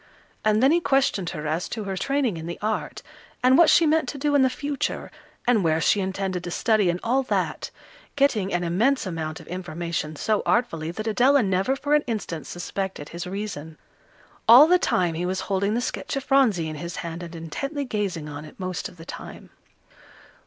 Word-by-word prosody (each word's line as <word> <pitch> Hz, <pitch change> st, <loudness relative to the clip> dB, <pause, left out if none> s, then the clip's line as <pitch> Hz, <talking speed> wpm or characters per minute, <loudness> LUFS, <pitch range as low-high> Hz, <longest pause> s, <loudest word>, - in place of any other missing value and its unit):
And 215 Hz, +2 st, +3 dB
then 270 Hz, -, +6 dB
he 340 Hz, -, +4 dB
questioned 270 Hz, -, +1 dB
her 155 Hz, -3 st, -6 dB
as 160 Hz, +3 st, -2 dB
to 220 Hz, -, -4 dB
her 195 Hz, -1 st, -3 dB
training 270 Hz, 0 st, 0 dB
in 160 Hz, +1 st, -6 dB
the 170 Hz, -, -5 dB
art, 215 Hz, +1 st, -3 dB, 0.4 s
and 255 Hz, +1 st, +6 dB
what 335 Hz, +2 st, +7 dB
she 335 Hz, -, +6 dB
meant 310 Hz, -4 st, +2 dB
to -, -, -5 dB
do 290 Hz, +1 st, 0 dB
in 285 Hz, -, +5 dB
the 260 Hz, -, +4 dB
future, 285 Hz, +2 st, -3 dB, 0.3 s
and 235 Hz, -5 st, +3 dB
where 160 Hz, -1 st, +2 dB
she 205 Hz, -, +3 dB
intended 190 Hz, -1 st, -2 dB
to 175 Hz, -, -5 dB
study 215 Hz, 0 st, +2 dB
and 175 Hz, +1 st, -1 dB
all 255 Hz, +4 st, +2 dB
that, 260 Hz, -, -2 dB, 0.5 s
getting 230 Hz, -9 st, +2 dB
an 175 Hz, 0 st, 0 dB
immense 220 Hz, +11 st, +1 dB
amount 160 Hz, -3 st, -4 dB
of -, -, -13 dB
information 170 Hz, -3 st, -4 dB
so 215 Hz, +7 st, 0 dB
artfully 165 Hz, -10 st, 0 dB
that 215 Hz, +6 st, -5 dB
Adela 255 Hz, +5 st, +4 dB
never 195 Hz, +6 st, +1 dB
for 285 Hz, +2 st, -1 dB
an 300 Hz, 0 st, +4 dB
instant 205 Hz, -8 st, -4 dB
suspected 180 Hz, -3 st, -5 dB
his 170 Hz, +1 st, -6 dB
reason. 180 Hz, -6 st, -6 dB, 0.7 s
All 245 Hz, +6 st, +10 dB
the 360 Hz, +3 st, +4 dB
time 175 Hz, -, +1 dB
he 170 Hz, +2 st, -2 dB
was 185 Hz, +1 st, -2 dB
holding 200 Hz, +2 st, 0 dB
the 240 Hz, -, 0 dB
sketch -, -, -3 dB
of 275 Hz, -, -2 dB
Phronsie 250 Hz, -, +3 dB
in 155 Hz, -1 st, -5 dB
his 170 Hz, +3 st, -6 dB
hand, 170 Hz, +1 st, -5 dB
and 170 Hz, -1 st, -8 dB
intently 275 Hz, -, -4 dB
gazing 195 Hz, -, -3 dB
on 145 Hz, 0 st, -7 dB
it 155 Hz, -, -14 dB
most 185 Hz, -1 st, -4 dB
of 180 Hz, -, -18 dB
the 165 Hz, -, -11 dB
time. -, -, -9 dB
195 Hz, 200 wpm, -24 LUFS, 170-255 Hz, 0.7 s, All